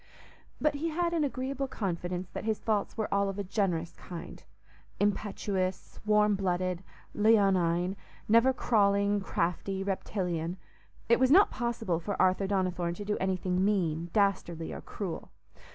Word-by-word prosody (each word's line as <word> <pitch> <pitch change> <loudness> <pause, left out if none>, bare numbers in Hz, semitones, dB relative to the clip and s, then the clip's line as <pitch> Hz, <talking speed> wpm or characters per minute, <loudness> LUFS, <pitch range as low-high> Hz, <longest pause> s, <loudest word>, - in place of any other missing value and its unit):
But 305 -1 +2
he 305 +4 -2
had 340 +2 0
an 325 -3 +2
agreeable 270 0 -2
confidence 180 -5 -3
that - - -5
his 220 -1 -1
faults 215 -1 -1
were 220 - 0
all 200 0 +2
of 195 - -5
a 200 - -2
generous 180 -4 -1
kind—impetuous, 190 +2 -4
warm 210 0 +4
blooded, 185 -2 -1 0.3
leonine; 190 -4 +3 0.3
never 230 +4 +5
crawling, 200 -4 +2
crafty, 190 +1 -1
reptilian. 180 -3 -2 0.5
It 235 - +4
was 260 0 +4
not 380 +8 +6
possible 235 -8 -1
for 200 +4 -4
Arthur 185 +1 +3
Donnithorne 180 -3 0
to 205 - -7
do 210 0 0
anything 185 -1 0
mean, 170 -5 0
dastardly, 180 -5 0
or - - -6
cruel. 190 -5 -6
195 Hz, 135 wpm, -30 LUFS, 180-215 Hz, 0.5 s, not